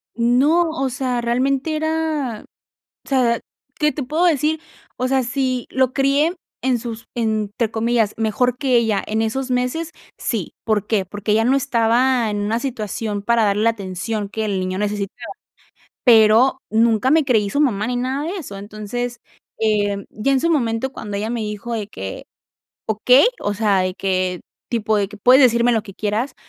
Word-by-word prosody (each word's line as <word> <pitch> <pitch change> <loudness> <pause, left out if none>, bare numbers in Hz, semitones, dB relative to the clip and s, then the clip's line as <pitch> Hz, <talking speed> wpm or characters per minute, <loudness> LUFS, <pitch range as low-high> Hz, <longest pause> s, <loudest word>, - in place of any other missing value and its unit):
No, 275 +9 +3
o 270 -4 -2
sea, 250 -1 -2
realmente 265 +6 0
era 310 -7 -1
o - - -26 0.4
sea, 245 -4 +2 0.4
¿qué 300 0 +3
te 295 - -4
puedo 310 +7 0
decir?, 310 -1 +1 0.4
o 255 - 0
sea, 265 0 +2
¿si 255 0 -1
lo 260 -1 +2
crié 280 +5 +2 0.3
en 255 -1 +1
sus 225 -1 -7
entre 220 -1 -1
comillas, 225 -1 +1
mejor 235 +3 0
que 260 -2 +2
ella 225 -4 +1
en 220 +1 -1
esos 260 +4 -2
meses?, 250 +7 -1 0.3
sí, 215 -9 -3
¿por 210 -2 0
qué?, 215 -4 +1
porque 205 +2 -4
ella 225 +1 +3
no 265 +3 +3
estaba 240 -2 +2
en 205 - -2
una 210 +3 0
situación 215 -5 -4
para 235 0 +2
darle 205 +1 +1
la 230 - +4
atención 200 0 -4
que 220 +1 -3
el 200 -2 -1
niño 185 0 -2
necesitaba, 205 -1 -3 0.7
pero 230 +2 +6
nunca 225 +2 +3
me 315 -2 +4
creí 220 -6 +2
su 285 - 0
mamá 220 -8 +1
ni 250 - -2
nada 260 +4 -2
de 375 +4 -3
eso, 225 - -8
entonces, 215 +4 -5 0.4
eh, 205 -2 +1
ya 225 +6 -1
en 265 - +2
su 335 - +1
momento 245 -4 0
cuando 205 -5 -6
ella 215 +3 -2
me 240 - -2
dijo 210 +3 -4
de 210 -3 -3
que: 95 - -7 0.6
"Okey", 250 - +5
o 205 - -1
sea, 205 -3 +2
de 185 0 -1
que 185 -2 -1 0.3
tipo 220 -2 +1
de 200 - 0
que: 210 - -11
"Puedes 250 +6 +6
decirme 235 0 +4
lo 225 -2 +1
que 200 -3 -12
quieras, 215 +6 -2
235 Hz, 180 wpm, -20 LUFS, 210-260 Hz, 0.7 s, pero